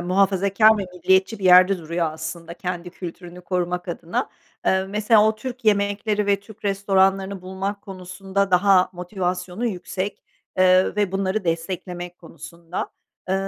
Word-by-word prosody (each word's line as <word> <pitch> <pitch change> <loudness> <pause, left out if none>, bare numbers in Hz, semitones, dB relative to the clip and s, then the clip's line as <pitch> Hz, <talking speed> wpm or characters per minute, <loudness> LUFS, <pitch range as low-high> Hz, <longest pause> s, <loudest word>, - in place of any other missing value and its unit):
muhafazakar 195 +4 +3
ve 195 - -2
milliyetçi 190 +4 +2
bir 195 - -7
yerde 185 +1 +7
duruyor 165 -1 -2
aslında 165 +1 -7
kendi 180 -1 -5
kültürünü 175 0 -9
korumak 180 0 -2
adına. 170 0 -3 0.4
Eee, 190 0 +3
mesela 210 +2 +3
o 220 - 0
Türk 250 +2 -7
yemekleri 205 0 +1
ve 200 -1 +2
Türk 215 +1 -16
restoranlarını 195 -1 +1
bulmak 195 +2 -4
konusunda 190 +1 -3
daha 185 0 +4
motivasyonu 180 +3 -3
yüksek, 190 -1 -4 0.4
eee, 185 +2 +4
ve 200 -3 +1
bunları 195 +1 -1
desteklemek 175 +1 -4
konusunda. 170 +1 -7 0.4
Eee, 190 - +1
190 Hz, 135 wpm, -23 LUFS, 180-200 Hz, 0.4 s, yerde